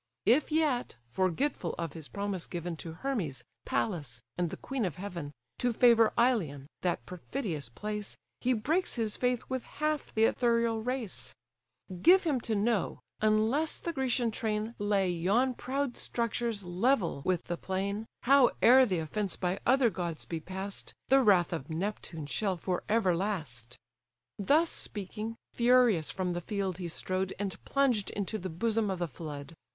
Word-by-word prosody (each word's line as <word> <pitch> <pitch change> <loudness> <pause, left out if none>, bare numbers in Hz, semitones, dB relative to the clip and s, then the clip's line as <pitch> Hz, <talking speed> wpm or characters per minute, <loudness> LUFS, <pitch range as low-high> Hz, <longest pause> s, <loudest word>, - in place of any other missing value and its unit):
If 275 +7 +4
yet, 300 -6 +1 0.2
forgetful 185 - 0
of 165 -1 -3
his 160 -3 -8
promise 200 -3 -3
given 175 -1 -4
To 165 0 -6
Hermes, 185 - -3 0.2
Pallas, 145 - -2
and 175 -1 0
the - - -6
queen 265 -3 -3
of 180 -7 -1
heaven, 180 -6 -6 0.3
To 245 - +2
favour 230 -2 +5
Ilion, 195 - +2 0.2
that 180 -1 -1
perfidious 180 - -4
place, 210 - -4 0.2
He 255 - +2
breaks 310 +11 0
his 225 -3 -1
faith 250 -1 0
with 260 -1 -2
half 305 +2 -2
the 220 - +4
ethereal 230 -1 +2
race; 250 -3 -3 0.7
Give 375 - +7
him 295 -7 +1
to 225 - 0
know, 210 +1 +1 0.2
unless 220 +9 +2
the 340 - -4
Grecian 255 -4 +1
train 215 +1 -2
Lay 205 -2 +2
yon 200 +10 +2
proud 270 +1 -2
structures 230 -2 -1
level 185 - +1
with 185 -2 +1
the 175 - -3
plain, 200 +4 -2 0.2
Howe'er 260 -1 +6
the 185 -4 0
offence 185 +5 -2
by 180 +1 -1
other 255 -2 +5
gods 170 -3 -4
be 165 - -3
pass'd, 190 +4 -5 0.2
The 270 0 +6
wrath 190 -7 +4
of 155 -3 -4
Neptune 165 -2 -3
shall 190 +5 -1
for 180 +1 -2
ever 210 -5 +3
last." 150 - -3 0.6
Thus 305 - +3
speaking, 215 +2 -4 0.2
furious 240 -9 +4
from 185 -2 -1
the 175 - -3
field 195 -2 -2
he 175 - -3
strode, 185 +3 -2
And 200 -1 -4
plunged 255 -7 +2
into 205 +2 -3
the 185 - -4
bosom 215 +5 0
of 190 - -1
the 175 -1 -1
flood. 150 +1 -7
205 Hz, 155 wpm, -31 LUFS, 175-240 Hz, 0.7 s, Give